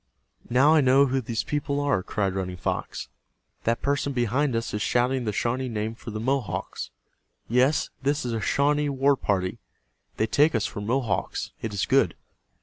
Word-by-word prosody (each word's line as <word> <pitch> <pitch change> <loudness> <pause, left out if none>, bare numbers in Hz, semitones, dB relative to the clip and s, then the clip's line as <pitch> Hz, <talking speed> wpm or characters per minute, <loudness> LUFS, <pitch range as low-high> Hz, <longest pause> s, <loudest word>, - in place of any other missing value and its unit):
"Now 135 +6 +5
I 155 - +5
know 135 +1 +5
who 135 0 0
these 115 -1 -2
people 145 -1 -1
are," 140 -9 +1
cried 100 0 -1
Running 90 -1 -3
Fox. - - -3 0.6
"That 115 +1 0
person 140 0 0
behind 125 +2 +1
us 115 0 -2
is 105 - -2
shouting 125 +2 +1
the 105 - 0
Shawnee 125 +5 -1
name 110 0 -2
for 115 - -10
the 110 0 -4
Mohawks. 130 - -2 0.6
Yes, 130 +5 +2
this 145 0 0
is 120 - -2
a 110 - -2
Shawnee 145 +3 +2
war 140 +1 +3
party. 100 -2 -1 0.6
They 110 - +2
take 145 +6 +3
us 115 - +1
for 105 - -5
Mohawks. 115 0 -1
It 110 - -3
is 100 -2 -1
good." - - +3
125 Hz, 175 wpm, -26 LUFS, 110-140 Hz, 0.6 s, Now